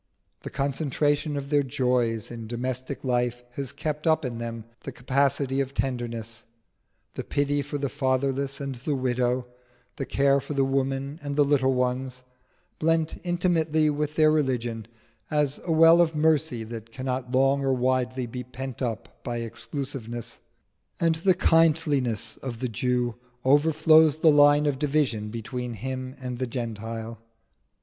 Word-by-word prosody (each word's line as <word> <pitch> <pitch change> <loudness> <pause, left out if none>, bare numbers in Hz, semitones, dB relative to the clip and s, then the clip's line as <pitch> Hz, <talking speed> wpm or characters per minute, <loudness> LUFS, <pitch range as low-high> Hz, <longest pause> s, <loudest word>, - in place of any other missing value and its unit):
The - - -7
concentration 145 +1 0
of 140 +1 -5
their 145 -1 +4
joys 125 -5 0
in 115 -2 -7
domestic 130 +3 -4
life 125 -1 0
has 135 +1 -5
kept 150 +2 -3
up 155 -2 +3
in 120 -2 -4
them 115 -1 -5
the 135 - -7
capacity 135 +1 +1
of 135 0 -4
tenderness: 115 -3 -3 0.7
the - - -5
pity 145 0 0
for 145 +1 -4
the 140 0 -1
fatherless 135 0 -1
and 140 -1 -4
the 135 +4 -3
widow, 125 -1 0 0.5
the 135 - -4
care 140 0 +3
for 145 - -6
the 135 -1 +3
women 135 +2 -1
and 145 -1 -4
the 145 0 +4
little 135 -2 +2
ones, 125 0 -2 0.6
blent 160 0 +1
intimately 165 -4 +2
with 150 +1 -2
their 155 -1 +5
religion, 120 -7 -1 0.4
is 150 -2 +1
a 170 - -1
well 165 +1 +7
of 165 -2 +1
mercy 155 -5 +2
that 115 0 -8
cannot 130 0 -3
long 135 +1 +3
or 135 - +2
widely 130 0 0
be 125 +2 -6
pent 130 0 -7
up 115 -4 -4
by 120 -1 -3
exclusiveness. 120 +1 -5 0.6
And 165 -1 +3
the 175 +3 +2
kindliness 150 - +2
of 120 -4 -6
the 125 0 -2
Jew 120 +1 -1 0.3
overflows 155 +2 +5
the 160 0 +5
line 145 0 +6
of 140 -3 0
division 140 -8 0
between 120 +2 -5
him 130 +3 -5
and 125 -2 -5
the 130 - -1
Gentile. 115 -1 -5
135 Hz, 150 wpm, -26 LUFS, 120-145 Hz, 0.7 s, well